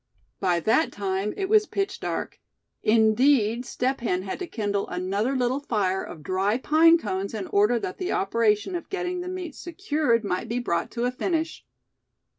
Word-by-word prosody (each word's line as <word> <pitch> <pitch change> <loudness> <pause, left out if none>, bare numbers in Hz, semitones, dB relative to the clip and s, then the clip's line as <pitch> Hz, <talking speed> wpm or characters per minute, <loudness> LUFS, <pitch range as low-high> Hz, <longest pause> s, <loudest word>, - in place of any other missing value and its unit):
By 180 -3 +2
that 225 - +2
time 195 +1 -2
it 390 - -1
was 425 0 +4
pitch 395 0 -2
dark. - - -4 0.4
Indeed, 230 +2 +3
Step 260 +2 -1
Hen 185 -6 -1
had 190 - -5
to 365 - -4
kindle 205 -7 -2
another 200 +8 -1
little 255 +1 +1
fire 200 -9 -1
of 155 - -9
dry 190 +6 +1
pine 320 +5 +5
cones 200 - -3
in 205 -3 -3
order 210 +6 +3
that 185 -5 -5
the 370 - -2
operation 210 - +1
of 345 - -5
getting 360 -2 -2
the 355 - -6
meat 365 -4 -5
secured 300 - 0
might 185 -3 -2
be 235 - -1
brought 170 -9 -1
to 240 0 -1
a 250 - +1
finish. 325 +4 -2
230 Hz, 175 wpm, -25 LUFS, 200-315 Hz, 0.4 s, pine